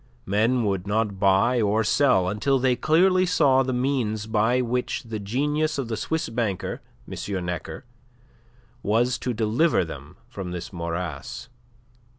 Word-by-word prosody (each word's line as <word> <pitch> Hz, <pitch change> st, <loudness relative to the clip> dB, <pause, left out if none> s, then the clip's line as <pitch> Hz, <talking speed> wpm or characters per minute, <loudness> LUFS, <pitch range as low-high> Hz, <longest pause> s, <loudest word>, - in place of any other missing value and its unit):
Men 115 Hz, +5 st, +2 dB
would 100 Hz, -2 st, -1 dB
not 105 Hz, -2 st, -1 dB
buy 100 Hz, +5 st, +3 dB
or 105 Hz, +1 st, +2 dB
sell 110 Hz, -5 st, +3 dB
until 105 Hz, +8 st, +1 dB
they 130 Hz, -1 st, +2 dB
clearly 185 Hz, +6 st, +3 dB
saw 140 Hz, -7 st, +4 dB
the 130 Hz, -1 st, -1 dB
means 125 Hz, -5 st, -1 dB
by 110 Hz, +3 st, +2 dB
which 125 Hz, 0 st, -1 dB
the 115 Hz, -2 st, -5 dB
genius 145 Hz, +9 st, -1 dB
of 130 Hz, -4 st, -3 dB
the 115 Hz, -, -1 dB
Swiss 160 Hz, +8 st, -2 dB
banker, 115 Hz, -5 st, -3 dB, 0.3 s
M. 95 Hz, -3 st, -4 dB
Necker, 85 Hz, 0 st, -5 dB, 1.0 s
was 120 Hz, +4 st, +1 dB
to 125 Hz, -, -2 dB
deliver 110 Hz, -, +2 dB
them 75 Hz, -2 st, -10 dB
from 95 Hz, -3 st, -6 dB
this 90 Hz, +2 st, -6 dB
morass. 85 Hz, -, -5 dB
115 Hz, 145 wpm, -24 LUFS, 100-130 Hz, 1.0 s, saw